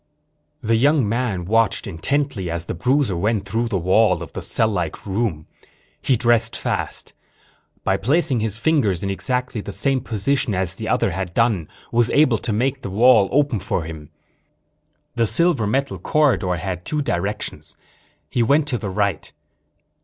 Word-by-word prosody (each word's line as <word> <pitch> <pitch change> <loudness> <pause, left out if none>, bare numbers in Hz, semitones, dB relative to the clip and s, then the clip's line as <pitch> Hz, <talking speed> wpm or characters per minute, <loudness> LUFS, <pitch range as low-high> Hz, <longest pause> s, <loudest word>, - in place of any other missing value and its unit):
The 115 0 +2
young 140 -1 +3
man 110 -5 -1
watched 110 +1 +1
intently 100 - -2
as 85 0 -3
the - - -4
bruiser 130 -5 +1
went 105 +3 0
through 115 +4 -1
the 105 -4 -1
wall 95 0 +2
of - - -11
the - - -5
cell 110 - +2
like 90 -7 -3
room. 95 -6 -2 0.6
He 130 - +2
dressed 120 -1 +2
fast. - - -3 0.7
By - - +1
placing 140 - +1
his 110 -1 -1
fingers 115 - +1
in 100 - -1
exactly 125 +2 -2
the 100 - -7
same 135 +5 +1
position 115 0 -1
as 95 0 -1
the 110 +3 -6
other 95 - +1
had 95 0 -4
done, 110 -9 +1 0.2
was 120 0 +3
able 135 -7 +3
to 120 - -3
make 130 +5 0
the - - -5
wall 110 0 +5
open 140 -5 +2
for 90 -2 -2
him. 80 -2 -9 1.0
The 115 -1 +1
silver 170 - +2
metal 130 -3 -1
corridor 125 - +1
had 90 0 -4
two 150 +6 -2
directions. 100 -1 -3 0.5
He 120 - -1
went 140 +6 +3
to 125 -4 -1
the 100 - -4
right. 100 +1 -1
110 Hz, 165 wpm, -21 LUFS, 95-130 Hz, 1.0 s, wall